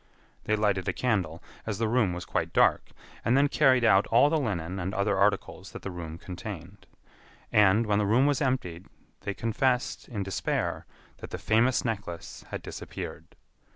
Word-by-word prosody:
They 110 - +2
lighted 100 -3 0
a - - +1
candle, 95 -10 -1 0.2
as 105 -3 -2
the 115 +1 0
room 110 -4 +2
was 90 0 -5
quite - - -2
dark, - - +3 0.3
and 120 +3 +3
then 140 +1 +5
carried 130 -4 +4
out 95 -3 +5
all 125 +6 +5
the 160 - +2
linen 95 - -2
and 95 +1 -3
other 100 +1 +1
articles 100 +1 0
that - - -8
the 100 - -4
room 85 -2 -7
contained. 90 +1 -8 0.6
And, 105 +2 +5
when 105 -1 +2
the 105 - +1
room 120 +6 +4
was 145 -1 +1
emptied, 95 - -2 0.3
they 100 - -4
confessed, 125 +3 0
in 105 -6 -3
despair, 95 -1 -2 0.3
that - - -9
the - - -5
famous 120 +5 +2
necklace 100 -7 -5
had - - -5
disappeared. - - -8
105 Hz, 175 wpm, -28 LUFS, 95-120 Hz, 0.6 s, then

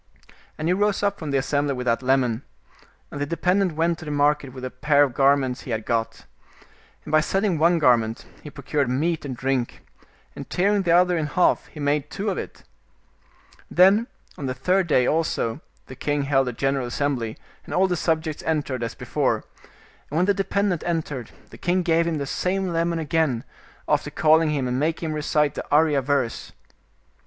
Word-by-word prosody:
And 155 - -3
he 175 - +3
rose 205 +1 +1
up 200 0 0
from 155 - -5
the 140 - +1
assembly 140 +1 0
with 125 0 -5
that 115 0 +1
lemon, 130 -3 +1 0.7
and 145 - -6
the - - +1
de 170 - -3
pendent 185 -1 +2
went 165 +1 0
to - - -9
the - - -5
market 145 -1 +1
with 130 0 -10
the 130 - -4
pair 145 +2 +3
of 135 -4 -1
garments 135 -1 +2
he - - -10
had 110 -2 -2
got. 115 -1 -2 0.8
And - - -7
by 155 0 +5
selling 190 0 0
one 170 +2 +4
garment 120 -6 +2 0.2
he 150 - -9
procured 140 -1 -2
meat 155 +5 -1
and 130 -3 -5
drink, 130 -2 -2 0.5
and - - -8
tearing 200 +3 +2
the 175 -3 0
other 180 +1 +4
in 155 - -1
half 180 +4 +2
he 150 - -12
made 145 0 0
two 200 +1 -2
of - - -3
it. - - -8 1.1
Then 195 +6 +5 0.3
on 140 - -3
the 130 - -3
third 180 +7 +1
day 130 -5 +3
also 155 -5 0 0.2
the 130 - -10
king 145 +2 -1
held 135 -2 +2
a - - -1
general 135 +1 -1
assem 140 +3 0
bly, 115 -2 -5 0.3
and - - -10
all 185 - +3
the 180 - 0
subjects 160 -2 -1
entered, 145 -5 -2
as 115 - -4
before, - - -1 0.7
and 150 - -3
when 180 - +3
the 200 - +3
dependent 195 -2 0
entered, 150 -8 -3 0.2
the - - -13
king 180 +1 +1
gave 170 0 +2
him 165 -2 -1
the 140 - -3
same 185 +6 -1
lemon 170 0 0
again, 155 -6 0 0.4
after - - +1
calling 160 +1 +3
him 140 -4 -1
and 125 +1 -1
making 160 +2 -1
him - - -2
recite 150 -1 +1
the - - -5
Arya 150 -1 +3
verse. 135 -3 -2
150 Hz, 200 wpm, -23 LUFS, 135-170 Hz, 1.1 s, by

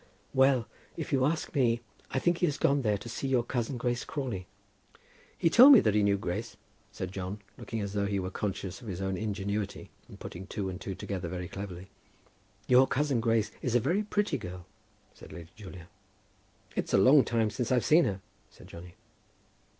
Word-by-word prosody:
"Well; 130 -3 +3 0.3
if - - -4
you 130 -1 +3
ask 155 +3 -1
me, 120 -4 +2 0.3
I - - -3
think 175 +5 +1
he 175 - +3
has 145 - -2
gone 140 0 +2
there 105 -4 +1
to 110 - -10
see 125 +4 -4
your 130 -3 +2
cousin, 120 +1 -2
Grace 120 0 -1
Crawley." 120 - -4 0.9
"He - - +2
told 250 - +9
me 250 - +9
that 105 - +2
he 105 - +3
knew 100 -1 +3
Grace," 90 -3 -4 0.3
said 95 -1 -5
John, 95 +1 -5 0.2
looking 115 -1 -5
as 100 -1 -4
though 100 -1 0
he 100 -1 -1
were 95 0 -4
conscious 95 +1 -4
of 120 - -11
his 95 -3 -5
own 95 0 -2
ingenuity 100 0 -3 0.2
in - - -12
putting 95 +3 -8
two 100 -2 -3
and 90 +1 -7
two 95 - -5
together 95 -2 -4
very 90 +1 -5
cleverly. 95 -1 -8 0.7
"Your 130 +2 +5
cousin 140 -3 0
Grace 115 -2 +1
is 125 -2 -1
a - - +6
very 170 - +1
pretty 205 -8 -1
girl," 90 -2 -8 0.5
said - - -14
Lady 85 -2 -10
Julia. 95 -4 -11 0.9
"It's - - 0
a - - +6
long 130 +8 +7
time 115 -2 0
since 125 +1 -3
I've 125 -2 +2
seen 165 +2 +5
her," 95 -1 -2 0.3
said - - -16
Johnny. 85 +1 -11
110 Hz, 195 wpm, -29 LUFS, 95-130 Hz, 0.9 s, told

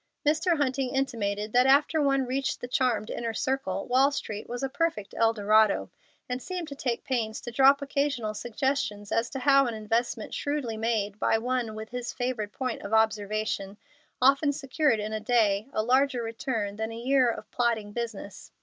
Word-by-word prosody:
Mr. 320 +3 +2
Hunting 270 -2 -1
intimated 210 -6 -1
that 250 +1 +5
after 295 +3 +4
one 275 -2 +2
reached 265 +2 -2
the 245 - -6
charmed 245 -4 0
inner 230 -1 -3
circle 205 -9 -2
Wall 265 +3 +4
Street 215 -7 -5
was 245 +2 -4
a - - +1
perfect 270 - -2
Eldorado, 220 -2 +3 0.4
and 250 0 -3
seemed 360 0 -5
to 280 - -7
take 245 -4 -2
pains 225 -4 -2
to 240 - -6
drop 275 +3 +5
occasional 280 -6 -1
suggestions 235 -3 -2
as 230 +2 +1
to 270 - -5
how 275 0 +4
an 235 - -3
investment 225 +3 -2
shrewdly 285 -6 -2
made 215 -2 -1
by - - +2
one 240 -1 -2
with 220 0 -7
his 245 0 -5
favored 245 -5 -3
point 255 0 -3
of 210 +2 -1
observation 215 -2 0 0.4
often 275 +3 +4
secured 275 -3 +1
in 210 +1 -4
a 215 - -1
day 215 -2 +2
a 215 - 0
larger 255 +1 +2
return 225 -3 -3
than 220 +1 -3
a 225 - -7
year 255 +1 +3
of 230 - -6
plodding 230 -4 0
business. 220 -3 -6
240 Hz, 175 wpm, -27 LUFS, 215-270 Hz, 0.4 s, that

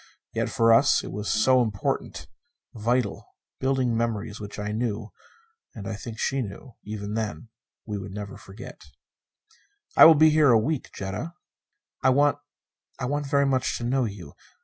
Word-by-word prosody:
Yet - - -1
for 115 0 +4
us, 135 +5 +4
it - - -7
was 105 +1 -4
so 130 +4 +4
important! 105 -4 -2 0.5
Vital. 115 -1 -2 0.2
Building 130 -3 +1
memories 110 -2 -2
which 105 -1 -8
I 105 0 -3
knew 110 -1 -3 0.6
and 100 -3 -7
I 110 - -3
think 115 +2 -8
that - - -6
she 135 0 0
knew, 110 +3 -8
even 105 0 -5
then 110 +1 -4 0.4
we 105 -2 -4
would 100 0 -8
never 100 0 -7
forget. 105 +6 -11 1.1
"I - - +10
will 160 - +9
be 155 +1 +6
here 150 -2 +5
a 115 - +6
week, 140 +6 -1
Jetta." 100 - -5 0.7
"I - - +4
want 145 +2 +3 0.6
I 135 - -3
want 145 +2 -2
very 140 -1 +3
much 130 -2 0
to - - -7
know 130 +1 +1
you. 100 -9 -8
115 Hz, 170 wpm, -25 LUFS, 105-135 Hz, 1.1 s, I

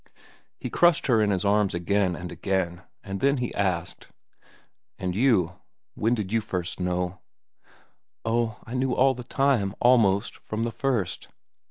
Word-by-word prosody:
He - - -6
crushed 175 -2 +4
her 115 -4 +3
in 105 - +2
his 100 0 0
arms 100 -2 +2
again 90 +1 +1
and 90 +1 -7
again, 95 -3 -2 0.2
and 95 -1 -5
then 140 +4 +2 0.2
asked: 90 -4 -2 0.9
"And 90 -1 -3
you? 100 -8 +2 0.3
When 115 +3 +1
did 105 -4 -4
you 115 0 +2
first 90 -4 -4
know?" 90 0 -2 1.1
"Oh, 115 -1 0
I 115 - -8
knew 130 0 0
it - - -3
all 135 +1 +5
the 125 -1 -8
time, 120 -7 +1
almost, 115 -4 +3
from 110 +1 -4
the 115 - -1
first." 115 -7 -2
105 Hz, 155 wpm, -26 LUFS, 90-120 Hz, 1.1 s, all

